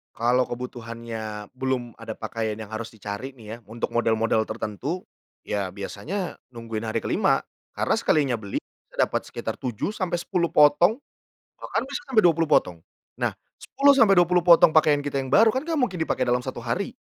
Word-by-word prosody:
Kalau 125 +2 +2
kebutuhannya 115 -3 -6
belum 130 -3 -2
ada 115 0 -8
pakaian 110 0 -4
yang 110 - -7
harus 110 +2 -6
dicari 105 +4 -6
nih 115 -4 -9
ya - - -12
untuk 115 +3 -5
model-model 115 -1 +2
tertentu, 130 - -4 0.3
ya 100 -3 -3
biasanya 160 - -5 0.2
nungguin 115 -2 -6
hari 110 - -1
ke-5. - - +2 0.3
Karena - - 0
sekalinya 140 -5 +2
beli 100 -3 -4
bisa - - -26
dapat - - -2
sekitar - - -5
7 125 - -4
sampai 175 -3 -1
10 170 -3 -1
potong 165 - +5 0.6
bahkan 230 +3 -2
bisa 275 0 -5
sampai 220 -7 +4
20 165 -2 +3
potong. 90 - +2 0.3
Nah, - - -1 0.3
10 280 0 +4
sampai 225 -8 +5
20 175 0 +4
potong 170 -2 +7
pakaian 150 -2 +4
kita 140 -1 -1
yang 130 - -6
baru 220 - +5
kan 260 - 0
gak 325 0 -2
mungkin 190 - 0
dipakai 160 - 0
dalam 125 +1 +1
satu 130 0 -6
hari. 155 - -3
125 Hz, 170 wpm, -25 LUFS, 110-175 Hz, 0.6 s, potong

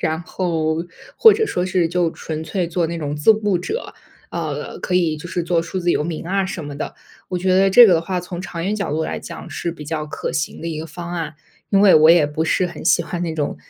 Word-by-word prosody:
然 160 0 -1
后 165 -2 -1 0.3
或 445 - +8
者 440 +1 +1
说 180 - -1
是 185 -2 +1
就 170 0 0
纯 160 -1 -6
粹 175 +2 -2
做 170 0 0
那 170 0 -4
种 145 -1 -3
自 150 +9 +5
雇 210 -3 0
者， 430 - -5 0.4
呃， 155 -4 -4
可 185 - -2
以 165 -4 +1
就 165 +3 -9
是 175 -1 -2
做 170 -1 +1
数 180 +3 -4
字 175 -1 +1
游 - - +1
民 165 +1 -5
啊 195 +1 +1
什 190 -4 -5
么 145 -1 -7
的。 - - -5 0.3
我 180 - -2
觉 185 +1 +1
得 195 +1 +5
这 240 +4 +9
个 185 - +5
的 165 - +2
话 180 +2 -3
从 175 0 -7
长 170 -2 -5
远 200 +3 0
角 200 -2 -3
度 160 +2 -1
来 - - -3
讲 - - -9
是 170 - -3
比 150 -3 -10
较 155 0 -3
可 - - -4
行 155 - -3
的 170 - -3
一 155 -2 -4
个 160 - -5
方 170 +2 -7
案， 160 -3 -4 0.4
因 195 - +4
为 200 -2 +7
我 155 0 +7
也 170 -2 +6
不 150 +2 -2
是 185 - +1
很 175 -3 -9
喜 - - +4
欢 175 - -5
那 165 -2 -2
种 150 -2 -2
170 Hz, 280 characters per minute, -20 LUFS, 160-185 Hz, 0.4 s, 这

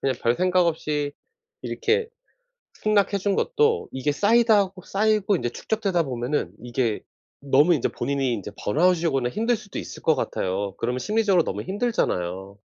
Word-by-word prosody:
그냥 135 -1 0
별 120 +1 +3
생각 180 +1 +2
없이 150 -3 -1 0.5
이렇게 450 +1 0 0.7
승낙해 205 -1 +1
준 195 +1 0
것도 450 -1 +1
이게 140 +3 -1
쌓이다하고 205 -1 +3
쌓이고 210 -1 +1
이제 120 - -2
축적되다 195 - -1
보면은 125 - -2
이게 120 -3 -1 0.4
너무 145 +5 +4
인제 135 - 0
본인이 135 -3 -1
이제 105 -1 -6
번아웃이 170 - +2
오거나 135 -5 0
힘들 230 +3 0
수도 200 -2 -9
있을 - - -8
것 160 - +3
같아요. 95 -6 -2
그러면 125 +2 -2
심리적으로 210 -2 +2
너무 - - -3
힘들잖아요. 100 - -2
170 Hz, 370 characters per minute, -24 LUFS, 125-205 Hz, 0.7 s, 너무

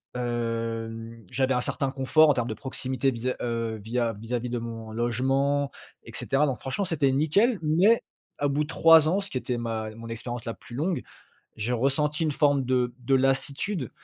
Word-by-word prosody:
hem, 115 -2 -3
j'avais 130 0 +1
un 125 - +1
certain 135 0 -1
confort 150 +4 +4
en - - +6
termes 120 -2 -1
de - - -1
proximité 130 +3 -2
vis, 125 +2 -2
heu, 115 -2 -2
via 115 0 0
vis-a-vis 120 +3 -4
de 120 -1 -2
mon 115 -1 -7
logement, 135 +5 +1 0.3
et - - -11
cetera. 140 +2 +1
Donc 135 -3 -2
franchement, 135 +9 -2
c'était 145 -6 +1
nickel, 195 - +3
mais 180 +10 +4 0.4
à 145 - +3
bout 145 +2 +1
de - - -6
3 165 -2 +6
ans, 190 +4 +2
ce 195 - -5
qui 130 - -3
était 125 -1 -2
ma 110 -2 -3
mon 115 0 -9
expérience 120 +1 -5
la 115 - -3
plus 120 - -14
longue, 165 +5 -1 0.6
j'ai 110 +3 -2
ressenti 145 +5 +1
une 150 - +1
forme 140 -2 +2
de 125 -1 +1
de 125 +2 +1
lassitude 135 - +1
130 Hz, 190 wpm, -26 LUFS, 115-145 Hz, 0.6 s, en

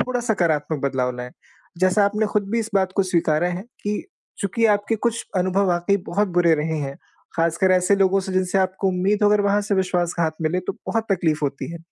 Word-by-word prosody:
थोड़ा 250 -1 -1
सकारात्मक 160 - 0
बदलाव 130 -2 0
लाएँ, 125 0 -6 0.5
जैसा 185 +3 +3
आपने 210 +2 +1
खुद 210 0 0
भी 230 - +1
इस 225 -1 -3
बात 190 -1 +2
को 200 - +4
स्वीकारा 170 -2 +1
है 180 +2 -4 0.2
कि 205 0 -2 0.3
चूँकि 225 +4 +1
आपके 205 +2 -1
कुछ 235 +1 -1
अनुभव 185 +2 +1
वाक़ई 175 +3 +2
बहुत 205 +3 +1
बुरे 170 -2 +5
रहे 160 +1 -2
हैं 140 -1 -4 0.4
ख़ासकर 170 +2 +1
कर - - +4
ऐसे 185 +2 +3
लोगों 195 0 +3
से 190 0 -5
जिनसे 185 +1 +1
आपको 190 +1 0
उम्मीद 190 +3 0
हो 205 - +6
अगर 210 0 +3
वहाँ 200 +1 +2
से 205 0 -1
विश्वासघात 175 -3 0
मिले 165 +3 0
तो - - -1
बहुत 225 -1 -1
तक़लीफ़ 160 -4 +1
होती 140 +3 -3
है, 170 - -7
185 Hz, 210 wpm, -22 LUFS, 170-205 Hz, 0.5 s, हो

